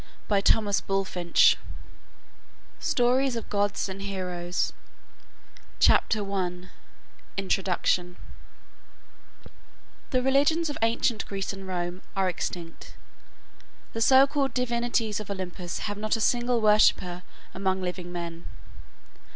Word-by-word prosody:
The 200 -2 +3
Druids - - +5 0.4
Iona 195 0 +2
GLOSSARY 175 -2 -7 1.5
STORIES 250 +1 +2
OF 230 - -5
GODS 205 0 0
AND 190 0 -7
HEROES 180 -3 -3 1.1
CHAPTER 205 -3 +3
I 180 -1 -3 0.7
INTRODUCTION 180 -2 0 1.9
The 255 -2 +1
religions 290 +4 +2
of - - -6
ancient 230 0 +1
Greece 195 0 -3
and 195 -1 -9
Rome 175 0 -3
are 195 -1 +1
extinct. 175 -2 -5 1.0
The 225 - -4
so 265 +3 +7
called 275 -2 -1
divinities 235 -3 0
of 215 - -8
Olympus 180 -2 -5
have 205 -1 -4
not 215 +1 0
a - - -3
single 240 +1 +1
worshipper 210 -4 +3 0.3
among 190 0 -1
living 180 -1 -4
men. 170 -1 -6
195 Hz, 110 wpm, -27 LUFS, 180-235 Hz, 1.9 s, so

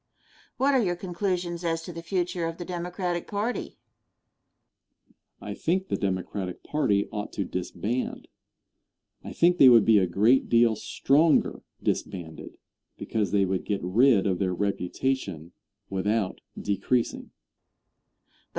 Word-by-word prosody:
Question. - - -33
What 275 +2 +3
are 260 -3 +3
your 175 -3 0
conclusions 180 -1 -3
as 165 -1 -1
to 175 - -8
the 165 - -7
future 175 0 -2
of 165 0 -5
the 175 - -6
Democratic 175 0 -3
party? 210 +4 -3 1.6
Answer. - - -15
I - - -5
think 190 +3 -1
the - - 0
Democratic 95 -1 -3
party 105 -10 +1
ought 105 -1 -4
to 100 - -2
disband. 105 +6 -3 1.0
I - - -7
think 175 +1 +3
they 135 - +9
would 115 -3 +7
be 110 -2 +6
a 95 - +1
great 110 +9 +3
deal 115 -1 +4
stronger 145 +8 +2 0.2
disbanded, 85 -4 -4 0.4
because 110 -2 -2
they 100 -1 +2
would 95 -1 -1
get 100 -2 -2
rid 110 +3 +4
of 95 -3 0
their 95 -2 0
reputation 100 - -2 0.4
without 100 +1 -1 0.2
decreasing. 115 +4 -1
120 Hz, 135 wpm, -26 LUFS, -, 1.6 s, they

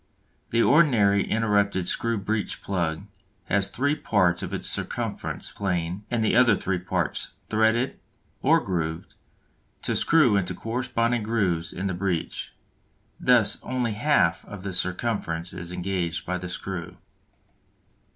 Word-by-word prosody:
The 115 0 +3
ordinary 110 -11 +4
interrupted 100 -4 +1
screw 115 +3 0
breech 105 +1 -2
plug 85 -3 -1 0.4
has 100 +1 +1
three 145 +3 +1
parts 95 - +2
of - - -5
its - - -3
circumference - - -3
plane 90 0 -2
and 120 -2 0
the 110 - +2
other 120 -3 +6
three 95 -1 -1
parts 90 -2 -2 0.2
"threaded," 110 +4 +2 0.4
or - - +5
grooved, 85 -3 -3 0.7
to - - 0
screw 150 -10 +4
into 90 -2 -1
corresponding 115 +1 -1
grooves 95 -7 0
in 95 - -4
the 95 - 0
breech; 90 -2 -2 0.7
thus - - +3
only 125 -3 -1
half 105 - +2
of 105 -3 -9
the 95 -1 -4
circumference 90 -2 -2
is 85 0 -7
engaged 90 -3 -2
by 90 0 -2
the 90 0 -6
screw. 90 -1 -5
100 Hz, 130 wpm, -26 LUFS, 90-115 Hz, 0.7 s, other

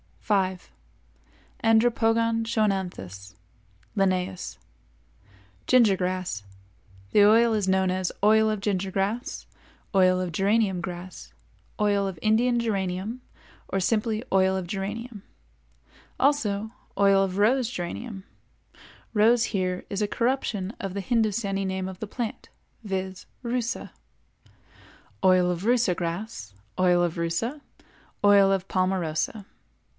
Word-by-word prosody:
5. 190 -3 -1 0.9
Andropogon 225 0 +3
Schoenanthus 180 - -2 0.6
L.—Ginger 105 - -1
Grass. 180 - -2 0.7
The 210 - +5
oil 230 +2 +5
is 210 -3 0
known 190 -1 +2
as 185 -1 -2
Oil 220 +1 +5
of 215 -2 -2
Ginger 195 -2 -1
Grass, 205 +6 -2 0.5
Oil 185 -1 +4
of 180 -2 -3
Geranium 195 +1 +1
Grass, 180 +1 -8 0.5
Oil 200 -1 +2
of 190 -3 -5
Indian 235 +3 +3
Geranium 200 +2 -2 0.5
or 195 - -1
simply 215 +3 0
Oil 190 0 +3
of 185 -2 -3
Geranium, 210 +4 -5 1.0
also 220 -7 +1 0.3
Oil 195 -1 +5
of 190 -1 -3
Rose 235 +4 +3
Geranium 195 +2 -5 0.9
["Rose" 225 +2 +4
is - - +3
here 185 -3 -2
a 205 +1 0
corruption 230 -4 -1
of 195 -2 -4
the 200 - -3
Hindostanee 205 -3 0
name 190 0 -3
of 185 -1 -9
the 215 - -5
plant, 230 +1 -5 0.4
viz., 190 -1 -4 0.2
Rusa], 240 0 -2 1.3
Oil 185 -1 +4
of 175 +1 -4
Rusa 235 -4 +3
Grass, 170 - -5 0.3
Oil 180 -1 +4
of 170 -2 -1
Rusa, 170 - -2 0.6
Oil 200 -1 +6
of 190 -1 0
Palmarosa. 185 +2 -1
195 Hz, 110 wpm, -26 LUFS, 185-220 Hz, 1.3 s, Oil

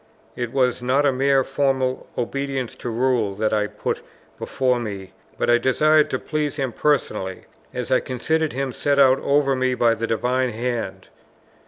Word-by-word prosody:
It 120 -2 -3
was 125 -2 +1
not 130 +4 +2
a 140 - +4
mere 135 +1 +2
formal 135 -1 -1
obedience 135 0 -3
to 120 - -5
rule 115 -4 0
that 110 +1 0
I 105 -1 +1
put - - -4 0.4
before 125 -2 0
me, 100 -5 -6 0.2
but - - 0
I 120 0 +5
desired 150 +4 +3
to 130 - -1
please 150 0 -2
him 135 -4 -2
personally, 105 -11 -1 0.3
as 125 -1 -5
I 130 - +5
considered 155 +5 -1
him 135 0 -2
set 145 +3 0
over 140 +1 +4
me 130 0 0
by 120 -2 +3
the 115 0 -3
Divine 125 +2 0
Hand. 120 +1 -4
130 Hz, 165 wpm, -22 LUFS, 120-140 Hz, 0.4 s, I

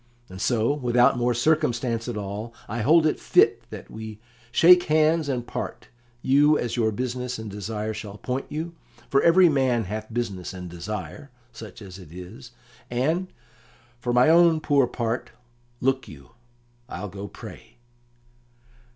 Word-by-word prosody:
"And 95 +1 -9
so, 115 +3 +2
without 125 -3 +3
more 120 0 +1
circumstance 120 -4 0
at 120 -3 -4
all, 105 +3 -6
I 115 +2 -3
hold 155 +7 +5
it 155 - +1
fit - - +3
that - - -10
we 110 -1 -8 0.3
shake 175 +6 +6
hands 155 0 +2
and 125 -3 -2
part, - - -6 0.3
you 145 +3 +4
as 120 - -2
your 110 -3 +1
business 125 +2 -3
and 110 -2 -7
desire 105 +2 -4
shall 105 -1 -8
point 125 +4 -4
you 160 +3 -4 0.4
for 140 - +4
every 175 +2 +6
man 130 -6 +2
hath 110 +3 -6
business 100 -6 -4
and 90 -1 -7
desire, 95 - -6 0.2
such 110 -2 -11
as 95 -1 -10
it 90 -5 -13
is 90 +7 -10 0.4
and, 160 +10 -1 0.7
for 120 - -2
my 125 +2 +5
own 165 0 +5
poor 140 -4 +2
part, 120 0 -3 0.5
look 130 0 0
you, 70 +2 -13 0.6
I'll 95 +4 -5
go 100 +1 -7
pray." - - -12
120 Hz, 150 wpm, -25 LUFS, 105-140 Hz, 0.7 s, shake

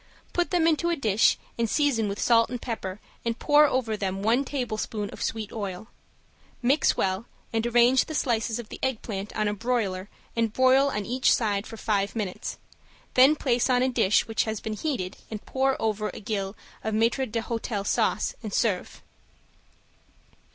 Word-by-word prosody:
Put 350 0 +1
them 350 -3 +2
into 330 +1 +2
a 340 - +2
dish 220 -7 +3 0.2
and 230 -1 +1
season 245 -8 +2
with 200 - -4
salt 230 -1 +4
and 245 0 -4
pepper 205 -5 -5 0.2
and 230 0 -1
pour 295 +2 +5
over 245 -5 0
them 195 -1 -3
one 235 +5 +3
tablespoon 220 -6 -3
of - - -10
sweet 220 -2 -3
oil. 200 0 -5 0.7
Mix 270 +5 +2
well 190 +4 -1 0.3
and 225 +1 +1
arrange 240 +2 +4
the 315 - -6
slices 230 -4 0
of 235 -3 -7
the - - -8
eggplant 215 -6 -3
on 215 - +1
a 205 - 0
broiler 205 -4 -1 0.3
and 230 -2 +1
broil 260 +2 +5
on 210 -6 -3
each 250 +2 +2
side 205 -3 -1
for 225 - -9
five 200 -2 0
minutes, 205 -5 -4 0.6
then 265 +4 +7
place 245 -4 +1
on 250 0 +3
a 260 - +2
dish 205 -5 +3
which 225 -1 0
has 220 -2 -3
been 220 - -4
heated 215 -7 -3
and 215 -2 -7
pour 265 0 0
over 215 -1 -1
a - - -6
gill 200 -1 -3 0.3
of 220 -1 -1
maitre 235 +4 +2
d'hotel 225 -2 -3
sauce, - - +1
and 215 -4 -4
serve. 210 -7 -1
225 Hz, 175 wpm, -26 LUFS, 210-255 Hz, 0.7 s, then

